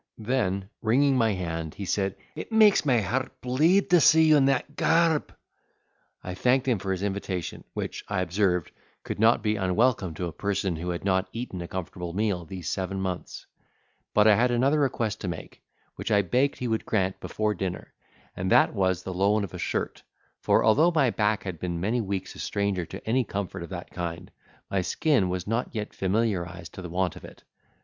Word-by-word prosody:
Then, 105 -5 -1
wringing 135 +5 +3
my 115 -4 +3
hand, 80 -4 -4
he 100 - -5
said, 95 0 -1 0.2
"It - - -7
makes 215 -7 +5
my 125 -4 +4
heart 125 +7 -3
bleed 160 +11 +2
to 175 -2 +6
see 160 +2 +6
you 155 -1 +6
in 140 -2 +5
that 135 +2 0
garb!" 165 -1 +2 0.9
I 90 - -5
thanked 125 +7 +2
him 120 -6 +2
for 95 0 -3
his 95 0 -2
invitation, 95 -3 -3
which, - - -4
I 100 -2 -1
observed, 90 -1 0 0.3
could - - -5
not 110 0 +4
be 105 -1 +1
unwelcome 95 -1 +1
to 90 - -3
a 85 - -4
person 95 +1 -1
who 85 +3 -4
had 90 +2 -4
not 95 -1 +1
eaten 115 -6 -5
a 85 - -5
comfortable 90 -1 -5
meal 100 -3 -1
these 90 0 -7
seven 95 0 -2
months; 95 -2 -4 0.7
but 105 - +5
I 110 - +7
had 120 +4 +3
another 135 +5 +2
request 115 -6 -1
to 95 - -3
make, 85 -2 -7 0.4
which - - -4
I 100 0 +4
begged 130 +9 +1
he 125 - -3
would 110 -1 -1
grant 95 -3 0
before 110 0 -1
dinner, 90 -1 -5 0.4
and 95 +1 -2
that - - +5
was 95 -3 0
the 95 - -5
loan 100 +3 +2
of 95 - -6
a - - -6
shirt; - - -2 0.4
for - - +3
although 145 +10 +5
my 150 -8 +2
back 105 -1 0
had 90 -5 -5
been 85 -2 -3
many 110 +7 0
weeks 100 -2 -4
a - - -12
stranger 100 -4 -1
to - - -10
any 125 +3 +2
comfort 100 -5 -4
of 85 - -7
that 90 -2 -7
kind, 85 +1 -5 0.4
my 95 - 0
skin 115 - +1
was 90 -1 -3
not 115 +3 -1
yet 105 -1 -4
familiarised 90 -4 -1
to - - -8
the 90 - -7
want 90 0 -1
of - - -12
it. - - -13
100 Hz, 200 wpm, -26 LUFS, 90-120 Hz, 0.9 s, I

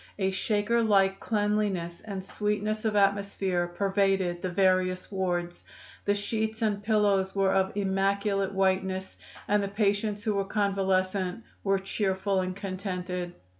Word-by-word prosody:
A 190 -1 +1
Shaker 210 +4 +1
like 195 -3 +3
cleanliness 205 -5 -1
and 195 -3 -6
sweetness 210 +2 -2
of 215 -1 +1
atmosphere 195 -3 +1
pervaded 195 -1 +1
the 185 - -2
various 185 0 +1
wards; 175 -2 -2 0.4
the 205 - +2
sheets 220 +2 -2
and 205 -2 0
pillows 205 -3 +2
were 195 -1 +3
of 190 +1 +1
immaculate 195 0 +1
whiteness 190 0 0 0.3
and 205 0 +3
the 200 - -1
patients 205 0 0
who 215 - +1
were 200 -1 0
convalescent 195 -1 0 0.2
were 195 -1 +2
cheerful 195 0 -1
and 185 0 -3
contented. 185 -2 -4
195 Hz, 130 wpm, -28 LUFS, 190-205 Hz, 0.4 s, like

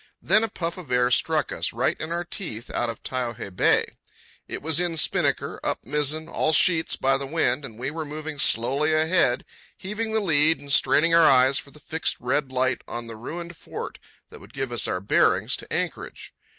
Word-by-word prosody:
Then 215 +5 +3
a 225 - -1
puff 170 -3 -4
of 175 - -11
air 125 0 +2
struck 155 +4 +1
us, - - -2
right - - 0
in 160 - -5
our 170 +1 -1
teeth, 145 - -7
out 120 - -1
of 115 - -7
Taiohae 120 -6 -4
Bay. - - +3 0.6
It - - -6
was 160 +1 +1
in 175 -2 0
spinnaker, - - +1
up - - -2
mizzen, 150 +4 -1
all 160 -1 0
sheets 165 +1 +4
by 135 0 +2
the 135 0 -5
wind, 145 -3 0
and 115 -5 -9
we 130 +4 -3
were 160 +1 -4
moving 155 0 -7
slowly 140 +5 +3
ahead, 160 -5 +2 0.3
heaving 215 +3 -4
the 220 - +1
lead 160 -4 +3
and 140 -1 -4
straining 165 +4 +4
our 165 -1 +7
eyes 130 +1 +4
for - - -11
the 150 - -16
fixed 160 +1 -2
red 130 +2 -1
light 130 0 0
on 120 0 -5
the 115 -1 -8
ruined 170 +9 -7
fort - - -8 0.3
that - - -11
would - - -16
give 135 -2 -3
us 120 - 0
our 90 - -2
bearings 100 - +2
to - - -11
anchorage. - - -4
150 Hz, 205 wpm, -24 LUFS, 125-165 Hz, 0.6 s, our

